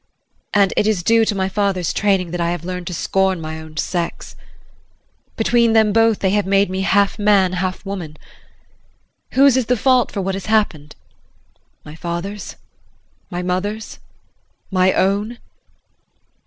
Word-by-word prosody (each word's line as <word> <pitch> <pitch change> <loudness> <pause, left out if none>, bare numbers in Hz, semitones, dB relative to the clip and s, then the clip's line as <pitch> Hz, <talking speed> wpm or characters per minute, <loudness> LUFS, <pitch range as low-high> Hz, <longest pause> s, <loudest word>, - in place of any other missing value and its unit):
And 200 -2 +3
it 210 - +2
is 205 -5 0
due 225 +3 +4
to 210 - -1
my 190 -1 0
father's 195 -3 -1
training 195 -4 +1
that 175 0 -3
I 170 - 0
have 170 -1 -4
learned 180 -1 -5
to 180 - -4
scorn 190 +1 0
my 160 0 -6
own 160 0 -12
sex. 170 +1 -3 1.0
Between 235 0 +3
them 220 -2 +4
both 225 -1 +3
they 190 - 0
have 205 -1 0
made 195 0 +2
me 190 0 -2
half 200 +1 +2
man, 200 -3 +3
half 185 +1 -3
woman. 175 -6 -6 1.2
Whose 275 -1 +5
is 255 -3 0
the 250 - +2
fault 255 +2 +2
for 205 - -4
what 195 0 -2
has 195 +1 -6
happened 190 -9 0 0.9
my 150 - -10
father's? 170 +5 -5 0.7
My 180 -1 -4
mother's? 205 +4 -3 0.7
My 185 0 +3
own? 205 +6 0
195 Hz, 155 wpm, -19 LUFS, 180-210 Hz, 1.2 s, Whose